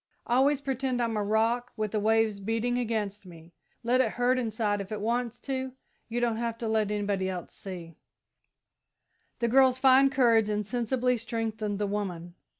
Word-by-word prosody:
I 240 - +1
always 280 +1 +3
pretend 265 -2 -2
I'm 230 -2 0
a 210 - 0
rock, 225 +4 0
with 215 -2 -2
the 215 - 0
waves 220 -1 +2
beating 225 +4 -1
against 215 -4 -2
me. 170 -2 -14 0.3
Let 250 +2 +3
it 225 -4 0
hurt 250 +1 +2
inside, 220 -3 -1
if 195 - -9
it 215 - -3
wants 235 +2 -1
to 265 -1 -3 0.4
you 235 +1 -1
don't 235 -2 0
have 230 -1 -2
to 230 - -4
let 220 -2 +1
anybody 200 -2 -1 0.2
see!" 175 -4 -9 1.4
The 235 - 0
girl's 260 +1 +5
fine 265 +1 +6
courage 235 -5 +3
insensibly 240 +4 0
strengthened 225 -2 -3
the 205 - -1
woman. 185 -4 -4
225 Hz, 165 wpm, -28 LUFS, 210-245 Hz, 1.4 s, fine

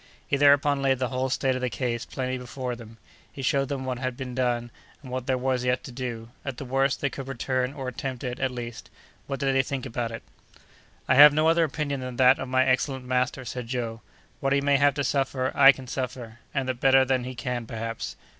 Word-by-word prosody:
He - - 0
thereupon 140 0 +4
laid 135 -1 +2
the 130 -1 -1
whole 130 0 -1
state 130 0 +1
of 130 - -3
the 125 - 0
case 120 -2 -2
plainly 130 -1 -3
before 125 0 -5
them; 115 -1 -12 0.3
he 135 - -8
showed 135 +1 +1
them 135 -2 -3
what 130 -1 -3
had 130 -1 -3
been 130 -2 -5
done, 120 -2 -1 0.3
and 130 - -9
what 130 0 -4
there 130 -1 +2
was 130 -1 0
yet 125 0 0
to - - -8
do; 120 -2 -5
at 135 -3 -5
the 140 - -6
worst, 135 +1 +1
they 140 - +1
could 135 -1 -7
return, 130 0 -1
or 135 -2 -6
attempt 130 +1 -5
it, 125 -1 -4
at 130 - +1
least.—What 125 +2 -8
did 135 -1 +1
they 135 - +4
think 135 0 -4
about 120 -2 -3
it? 115 0 -7 0.8
"I - - +4
have 145 +2 +9
no 155 +1 +3
other 165 +1 +4
opinion 145 -2 -3
than 125 -1 -6
that 130 +1 +5
of 135 - -4
my 130 +1 +3
excellent 130 0 0
master," 125 0 -1
said 125 0 -5
Joe; 115 -2 -3 0.4
"what 135 0 +1
he 140 - +3
may 140 0 +3
have 145 0 +3
to 140 - -1
suffer, 135 -1 0
I 140 -1 +8
can 130 -1 -10
suffer, 125 -3 -5
and 135 -2 -2
that 130 -2 -2
better 135 0 +5
than 130 -1 +1
he 130 +1 -6
can, 120 -1 -3
perhaps. 115 -1 -5
130 Hz, 230 wpm, -26 LUFS, 125-135 Hz, 0.8 s, have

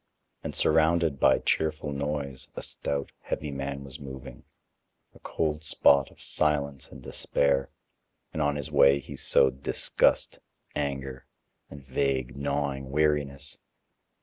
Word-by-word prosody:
And - - -4
surrounded 80 -2 +3
by 65 - +5
cheerful 75 -1 0
noise, 70 -1 -3
a - - -5
stout, 70 -1 -3
heavy 75 -1 -3
man 70 0 -4
was 70 -2 -9
moving, 65 -1 -9 0.7
a - - -17
cold 75 -1 -2
spot 70 -2 +4
of - - -21
silence 70 -3 0
and 65 - -12
despair, 70 0 0 0.6
and 80 - -2
on 75 -1 +2
his 70 -2 -4
way 70 0 +6
he 65 - -9
sowed 65 0 +4
disgust, - - +1 0.4
anger, 70 -2 -3 0.4
and 70 -2 -11
vague, 65 -2 -1
gnawing 70 -1 -2
weariness. 75 -1 0
70 Hz, 125 wpm, -28 LUFS, 70-75 Hz, 0.7 s, way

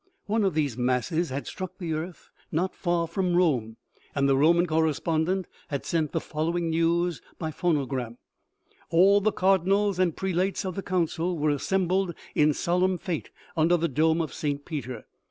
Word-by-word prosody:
One 215 +1 +1
of 190 -5 +1
these 145 -6 0
masses 130 +8 0
had 135 +2 -4
struck 185 0 -6
the 170 -4 -3
earth 165 +3 -6 0.2
not 180 +4 0
far 175 -1 0
from 180 +1 0
Rome, 125 -11 +1 0.4
and 140 -1 +2
the 135 - +4
Roman 170 +5 +4
correspondent 160 +3 0 0.2
had 140 -2 -4
sent 160 -3 0
the - - 0
following 165 +2 -2
news 170 +1 +1 0.2
by 160 -2 -3
phonogram: 135 -8 -1 0.4
" - - -52 0.3
All 195 +5 +5
the 215 +2 +2
cardinals 195 +1 +2
and 180 -4 +1
prelates 190 +1 -1
of 185 - -2
the 195 - -4
council 175 -1 -1
were 150 0 +2
assembled 185 +3 0 0.2
in 150 0 +4
solemn 180 +4 +1
fete 175 -2 -4 0.3
under 165 +2 +4
the 170 0 0
dome 160 +3 +2
of 160 - -4
St. 145 -1 -3
Peter. 130 -8 -5
170 Hz, 170 wpm, -27 LUFS, 150-185 Hz, 0.4 s, All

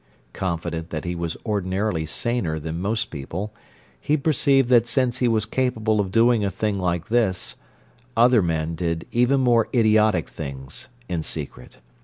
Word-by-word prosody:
Confident 85 -2 -3
that 75 +1 -5
he 90 - -2
was 85 -1 -4
ordinarily 95 -4 -1
saner 100 -5 -1
than 80 +2 -5
most 110 +3 -1
people, 85 +9 -5 0.5
he 150 - +1
perceived 140 -3 +3
that 120 -2 +5
since 125 +1 +1
he 125 - +2
was 110 -2 +1
capable 110 -3 0
of 100 -2 0
doing 115 0 +4
a 100 - +1
thing 100 +1 -2
like 90 -1 -1
this, 110 -6 0 0.6
other 120 -1 +6
men 80 -2 -1
did 85 -1 -2
even 125 +3 +3
more 120 -3 +3
idiotic 110 -6 +3
things, 70 - -7 0.2
in 85 -3 -2
secret. 75 -5 -6
105 Hz, 155 wpm, -23 LUFS, 85-120 Hz, 0.6 s, other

